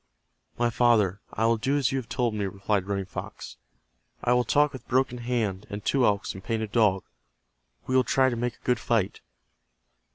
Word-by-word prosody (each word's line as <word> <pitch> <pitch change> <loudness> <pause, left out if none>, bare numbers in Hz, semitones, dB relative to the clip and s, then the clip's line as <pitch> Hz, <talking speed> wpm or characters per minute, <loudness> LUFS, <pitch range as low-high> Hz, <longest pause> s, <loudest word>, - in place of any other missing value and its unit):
"My 120 0 +1
father, 110 -5 +3
I 110 - 0
will 115 0 +3
do 135 +6 0
as 135 -2 +1
you 135 - 0
have 120 - -9
told 120 -3 0
me," 105 -2 -2
replied 100 0 -1
Running 100 -1 -2
Fox. 90 - -8 0.7
"I 120 - +3
will 125 0 +3
talk 145 +4 +2
with 130 - -10
Broken 125 -1 +1
Hand, 115 -5 -2
and 105 0 -6
Two 135 -3 +3
Elks 100 0 0
and 95 - -10
Painted 110 -1 -2
Dog. 105 -5 +3 0.8
We 130 - -1
will 130 - +5
try 130 +2 +2
to - - -2
make 120 0 -2
a - - -31
good 125 -2 +2
fight." 110 -4 0
115 Hz, 195 wpm, -26 LUFS, 100-125 Hz, 0.8 s, will